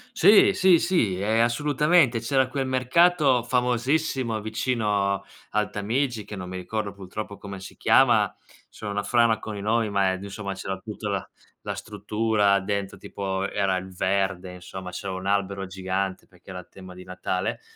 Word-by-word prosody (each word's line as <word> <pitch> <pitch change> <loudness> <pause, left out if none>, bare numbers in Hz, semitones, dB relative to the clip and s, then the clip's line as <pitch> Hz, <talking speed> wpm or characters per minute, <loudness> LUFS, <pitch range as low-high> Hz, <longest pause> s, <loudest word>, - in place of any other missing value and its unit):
Sì, 200 +2 +6
sì, 185 -2 +5
sì, 120 - +1
ehm, 110 +3 +2
assolutamente. 145 +1 +3
C'era 130 +3 +1
quel 135 0 -2
mercato 135 +1 +3
famosissimo 125 0 0
vicino 105 -3 0 0.3
al 105 0 0
Tamigi, 115 +3 -1
che 105 - -8
non 90 -2 -7
mi 95 - -6
ricordo 100 +3 -3
purtroppo 100 +1 -7
come 100 -1 -8
si 95 - -10
chiama; - - +4 0.4
sono 105 -2 -7
una 100 0 -1
frana 115 0 +3
con 110 - -6
i - - -5
nomi, 110 +1 +1
ma 100 -2 +2
ed 95 - -6
insomma 100 0 -5
c'era 95 0 -5
tutta 105 +1 -6
la 100 -2 -2 0.4
la - - -2
struttura 105 -2 +1
dentro, 100 0 -3
tipo 95 0 -3
era 95 -2 0
il 95 0 -8
verde, 95 -1 -1
insomma, 90 +1 -8
c'era 95 +2 -5
un 95 0 -6
albero 100 -1 0
gigante 95 0 -3
perché 90 0 -20
era 90 -1 -6
tema 95 -1 -12
di 90 0 -12
Natale, 90 0 -3
100 Hz, 165 wpm, -25 LUFS, 95-120 Hz, 0.4 s, Sì